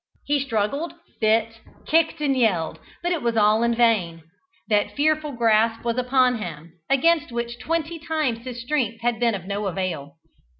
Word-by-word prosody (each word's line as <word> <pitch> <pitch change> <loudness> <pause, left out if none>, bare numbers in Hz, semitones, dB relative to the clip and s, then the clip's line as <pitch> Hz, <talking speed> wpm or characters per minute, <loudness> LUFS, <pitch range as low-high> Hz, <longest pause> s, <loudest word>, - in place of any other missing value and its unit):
He 290 0 +1
struggled, 270 +5 -2 0.2
bit, 225 +1 +1 0.3
kicked 325 0 +2
and 280 -2 +2
yelled, 200 -10 +1 0.2
but 350 - 0
it 335 -4 0
was 235 -1 0
all 215 +1 +4
in 235 0 +2
vain. 195 -9 +2 0.4
That 210 -2 +1
fearful 305 0 +1
grasp 225 -1 +2
was 235 +1 0
upon 250 -1 +2
him, 165 -4 -7 0.2
against 300 +2 +3
which 235 0 -4
twenty 330 +2 -2
times 310 -7 -1
his 245 -2 -6
strength 240 -5 -1
had 235 -1 0
been 235 -3 +2
of 185 -3 -7
no 200 +1 -2
avail. 175 -7 -4
235 Hz, 165 wpm, -23 LUFS, 215-285 Hz, 0.4 s, all